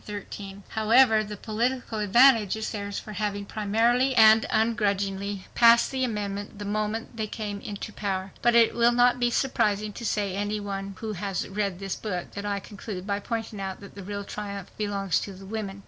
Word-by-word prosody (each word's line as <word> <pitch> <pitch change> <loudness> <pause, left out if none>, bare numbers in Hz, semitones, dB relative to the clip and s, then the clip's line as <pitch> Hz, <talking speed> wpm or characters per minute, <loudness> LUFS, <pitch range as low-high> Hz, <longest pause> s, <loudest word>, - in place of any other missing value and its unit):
However, 220 0 +4
the 210 0 -7
political 230 +2 -2
advantage 220 0 +5
is 220 0 -4
theirs 200 -1 -4
for 215 - -7
having 205 -1 -2
promptly 230 +6 +1
and 220 -1 +7
ungrudgingly 200 -3 0
passed 235 0 +6
the 260 -1 -1
amendment 205 -3 -3
the 205 - -6
moment 215 +3 -2
they 215 -1 -2
came 205 -1 -5
into 205 +1 -6
power. 195 -2 -3
But 240 0 +3
it 230 -1 +6
will 235 0 +4
not 245 +1 +4
be 240 -1 +2
surprising 215 -5 0
to 225 -1 -2
any 205 +1 -2
one 195 -1 -5
who 220 -1 -4
has 195 -1 -3
read 200 -2 -2
this 195 0 -4
book 180 -5 -4
that 205 0 -5
I 200 -1 -1
conclude 200 -1 -8
by 200 -1 -1
pointing 225 -1 -4
out 190 -1 -4
that 200 - -11
the 200 - -9
real 200 +1 -5
triumph 200 -2 -7
belongs 200 -4 0
to 200 - -6
the 190 +1 -12
women. 200 -1 -5
210 Hz, 180 wpm, -26 LUFS, 200-225 Hz, -, and